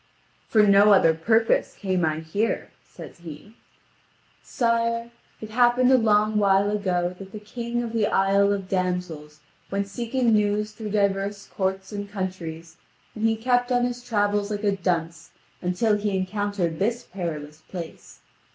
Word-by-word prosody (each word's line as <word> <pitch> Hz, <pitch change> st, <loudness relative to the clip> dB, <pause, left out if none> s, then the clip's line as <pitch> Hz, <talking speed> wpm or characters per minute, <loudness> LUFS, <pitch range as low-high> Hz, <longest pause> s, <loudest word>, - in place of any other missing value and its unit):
"For 215 Hz, -2 st, +4 dB
no 205 Hz, 0 st, +6 dB
other 165 Hz, -4 st, +5 dB
purpose 220 Hz, +8 st, +1 dB
came 185 Hz, -3 st, -1 dB
I 155 Hz, 0 st, 0 dB
here," 200 Hz, +8 st, -2 dB
says -, -, -12 dB
he. 170 Hz, +6 st, -11 dB, 0.9 s
"Sire, 230 Hz, 0 st, 0 dB, 0.3 s
it 220 Hz, 0 st, -9 dB
happened 245 Hz, +2 st, +4 dB
a 260 Hz, -, +7 dB
long 215 Hz, -1 st, +3 dB
while 200 Hz, 0 st, +3 dB
ago 180 Hz, -4 st, -1 dB
that 195 Hz, -1 st, -10 dB
the 215 Hz, -, -7 dB
king 235 Hz, +3 st, -4 dB
of 230 Hz, -1 st, -5 dB
the 220 Hz, -2 st, +2 dB
Isle 200 Hz, +1 st, +3 dB
of 195 Hz, -2 st, -2 dB
Damsels 180 Hz, -5 st, -3 dB, 0.3 s
went 200 Hz, 0 st, -2 dB
seeking 235 Hz, +2 st, 0 dB
news 210 Hz, 0 st, +1 dB
through 215 Hz, 0 st, -7 dB
divers 200 Hz, 0 st, 0 dB
courts 190 Hz, 0 st, -2 dB
and 205 Hz, -1 st, -5 dB
countries, 170 Hz, -4 st, -6 dB, 0.4 s
and 220 Hz, 0 st, -2 dB
he 225 Hz, -, +2 dB
kept 245 Hz, +2 st, +1 dB
on 245 Hz, 0 st, +3 dB
his 245 Hz, 0 st, -4 dB
travels 205 Hz, -3 st, 0 dB
like 205 Hz, 0 st, -4 dB
a 200 Hz, -1 st, +2 dB
dunce 170 Hz, -4 st, -2 dB, 0.3 s
until 185 Hz, +5 st, +1 dB
he 205 Hz, -1 st, -1 dB
encountered 190 Hz, -3 st, -2 dB
this 230 Hz, +4 st, 0 dB
perilous 155 Hz, -5 st, -6 dB
place. 170 Hz, -2 st, -9 dB
205 Hz, 150 wpm, -24 LUFS, 185-220 Hz, 0.9 s, a